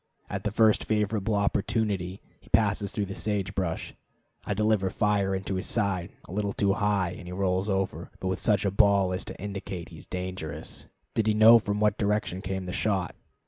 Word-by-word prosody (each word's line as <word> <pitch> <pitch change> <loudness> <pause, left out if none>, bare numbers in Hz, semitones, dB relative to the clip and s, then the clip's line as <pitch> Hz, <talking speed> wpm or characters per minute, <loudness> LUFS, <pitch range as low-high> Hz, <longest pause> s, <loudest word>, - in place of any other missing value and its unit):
At 95 +1 -4
the 105 - +1
first 110 0 +4
favorable 105 0 0
opportunity, 100 -2 0
as - - -33
he - - -20
passes 100 -2 +2
through 105 - -1
the 100 - -6
sage 100 -2 -2
brush, 95 -5 -2 0.5
I 100 - -2
deliver 105 -2 +2
fire 100 -1 +1
into 95 +1 -3
his 95 - -3
side, 100 -6 0 0.2
a - - -10
little 100 +1 -1
too 100 -1 +2
high, 100 -3 +1
and 90 -1 -9
he - - -6
rolls 95 +1 0
over, 95 -3 -1
but 95 - -3
with 95 0 -2
such 105 -3 +2
a 100 - +2
bawl 100 -2 +4
as 90 - -2
to - - -8
indicate 100 -3 -5
he 80 - -11
is - - -15
dangerous, 90 -4 -5 0.3
did 110 -1 +1
he 110 - +3
know 110 +2 +8
from 105 -1 -2
what 105 -1 +2
direction 105 -3 0
came 95 0 -3
the 90 - -5
shot. 95 -5 0
100 Hz, 205 wpm, -27 LUFS, 95-105 Hz, 0.5 s, know